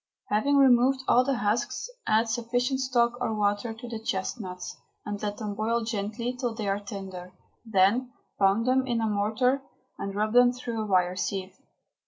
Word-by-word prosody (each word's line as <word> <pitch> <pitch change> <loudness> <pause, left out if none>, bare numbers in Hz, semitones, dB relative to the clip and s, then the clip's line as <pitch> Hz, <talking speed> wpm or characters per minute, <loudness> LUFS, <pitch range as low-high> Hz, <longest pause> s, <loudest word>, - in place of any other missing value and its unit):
Having 280 +7 +2
removed 265 0 +5
all 250 - +5
the 275 +1 0
husks, 245 - -1 0.2
add 220 +2 +3
sufficient 245 +3 0
stock 245 -2 +1
or 225 -3 0
water 205 +2 0
to 225 +2 -9
the 230 -2 -5
chestnuts, 190 -3 -4 0.3
and 205 -1 -4
let 205 -1 -3
them 210 -2 -4
boil 225 +3 0
gently 220 +2 -3
till 245 -2 -3
they 215 -3 -3
are 195 +1 0
tender. 190 -3 -8 0.3
Then 220 +4 +2 0.3
pound 200 +4 +3
them 260 +1 +2
in 240 -2 0
a 225 - 0
mortar 220 +6 +1 0.4
and 200 0 -4
rub 215 +1 0
them 245 0 +6
through 240 -3 -4
a 215 - -3
wire 180 -2 +2
sieve. 185 0 -3
225 Hz, 175 wpm, -27 LUFS, 205-245 Hz, 0.4 s, them